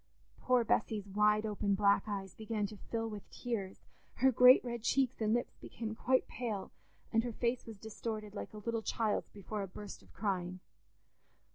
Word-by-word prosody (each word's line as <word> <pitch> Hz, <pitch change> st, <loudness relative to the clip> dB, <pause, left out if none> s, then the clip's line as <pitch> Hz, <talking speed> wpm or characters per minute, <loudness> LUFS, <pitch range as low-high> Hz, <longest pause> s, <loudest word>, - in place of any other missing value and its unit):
'" -, -, -36 dB
Poor 250 Hz, -1 st, +4 dB
Bessy's 215 Hz, -2 st, +1 dB
wide 210 Hz, +2 st, +3 dB
open 205 Hz, -1 st, 0 dB
black 200 Hz, 0 st, +4 dB
eyes 195 Hz, -3 st, -4 dB
began 220 Hz, -1 st, -2 dB
to 210 Hz, -, -6 dB
fill 225 Hz, -1 st, -1 dB
with 210 Hz, -2 st, -8 dB
tears, 205 Hz, -6 st, -4 dB, 0.3 s
her 265 Hz, +2 st, +4 dB
great 250 Hz, +1 st, +8 dB
red 235 Hz, -1 st, -3 dB
cheeks 260 Hz, +1 st, +1 dB
and 215 Hz, -1 st, +2 dB
lips 240 Hz, +2 st, 0 dB
became 220 Hz, -2 st, -6 dB
quite 255 Hz, +3 st, +2 dB
pale, 220 Hz, -6 st, -4 dB, 0.4 s
and 225 Hz, 0 st, +4 dB
her 240 Hz, -1 st, -3 dB
face 235 Hz, +2 st, -1 dB
was 225 Hz, -2 st, -8 dB
distorted 215 Hz, 0 st, -5 dB
like 205 Hz, -, -6 dB
a 215 Hz, -, -10 dB
little 230 Hz, +2 st, -2 dB
child's 220 Hz, -1 st, 0 dB
before 205 Hz, +1 st, -5 dB
a 195 Hz, -, -3 dB
burst 200 Hz, +2 st, -9 dB
of -, -, -20 dB
crying. 185 Hz, -3 st, -2 dB
215 Hz, 180 wpm, -34 LUFS, 205-235 Hz, 0.4 s, great